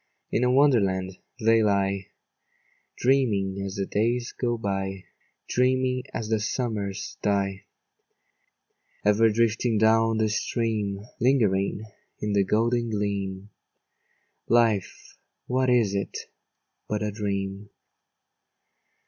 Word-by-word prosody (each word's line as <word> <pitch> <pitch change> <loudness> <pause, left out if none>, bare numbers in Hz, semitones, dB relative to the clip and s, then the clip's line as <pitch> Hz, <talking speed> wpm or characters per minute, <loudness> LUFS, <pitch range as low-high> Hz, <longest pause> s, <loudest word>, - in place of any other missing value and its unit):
In 120 - +1
a 125 - +3
Wonderland 100 -9 +2 0.2
they 115 0 +4
lie, 100 -2 +1 0.9
Dreaming 105 -7 +1
as 100 0 -5
the 100 -1 -1
days 120 +4 0
go 120 -2 -2
by, 95 -2 -3 0.4
Dreaming 130 0 +1
as 110 - -4
the 110 0 +1
summers 105 -3 -3
die: 100 -1 -1 1.4
Ever 105 +2 +5
drifting 115 +1 +1
down 115 +1 +3
the 110 - +2
streamâ 105 -2 -1
Lingering 105 -6 +2 0.4
in 105 -1 -2
the 100 -1 +3
golden 115 +4 +1
gleamâ 100 -1 -3 1.0
Life, 115 -5 +1 0.3
what 130 0 +1
is 115 -5 +3
it 100 -1 -3 0.7
but 105 0 -1
a 105 - -1
dream? 100 -1 -3
105 Hz, 105 wpm, -26 LUFS, 100-115 Hz, 1.4 s, Ever